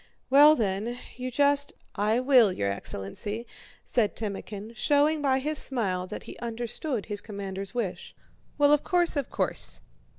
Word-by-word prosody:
Well, 295 +3 +8
then, 215 +1 -1 0.2
you 255 +1 -4
just..." 285 +2 +2 0.2
"I 215 +3 +1
will, 255 -5 +5
your 100 - -1
excellency," 100 - -4 0.4
said 220 -4 +1
Timókhin, 210 +1 -6
showing 295 +5 +3
by 270 -2 +2
his 295 +3 -1
smile 190 -8 -1
that - - -7
he - - -10
understood 235 +2 -3
his 205 -1 -4
commander's 195 -1 -6
wish. 220 -7 -4 0.4
"Well, 290 0 +5
of 295 - +3
course, 350 -2 +1
of 280 -3 -2
course!" - - -1
235 Hz, 145 wpm, -27 LUFS, 200-285 Hz, 0.4 s, Well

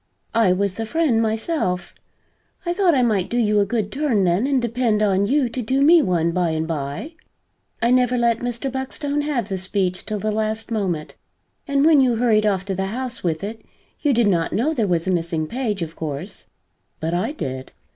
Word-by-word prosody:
I 225 -5 +4
was 195 +1 0
the 225 +2 -5
friend, 290 -6 +2
myself; 220 - -1 0.7
I 345 - 0
thought 355 -4 +3
I 255 - +3
might 210 -6 +1
do 240 - -1
you 210 -3 +3
a 200 - +2
good 215 -4 -1
turn 270 -8 +1
then 185 +8 +2
and 275 -2 +2
depend 235 -3 +1
on 200 -1 +2
you 275 +1 +2
to 250 +2 -4
do 265 +4 +1
me 330 +3 +7
one 170 - +1
by 175 0 +1
and 160 0 -2
by. 150 - -4 0.7
I 235 - +3
never 250 0 +3
let 235 -1 +2
Mr. 245 +2 -3
Buckstone 280 +2 -3
have 280 -8 -1
the 190 -3 -3
speech 185 -1 -1
till 215 - -2
the 215 +1 -1
last 220 +1 -2
moment, 185 -8 -2 0.5
and 280 0 +2
when 310 -3 +6
you 250 -3 +3
hurried 220 -2 +3
off 190 -2 0
to 195 - -2
the 190 +1 -2
House 250 +4 -4
with 165 0 -1
it, 220 +2 -6 0.4
you 295 - +2
did 240 -2 +3
not 170 -4 +1
know 280 +9 +1
there 225 -8 0
was 170 -3 0
a 190 - 0
missing 165 -2 -1
page, 215 -1 -2
of 165 0 -7
course, 150 -3 -6 0.5
but 160 +1 -2
I 180 +9 0
did." 130 - -5
220 Hz, 205 wpm, -22 LUFS, 185-255 Hz, 0.7 s, me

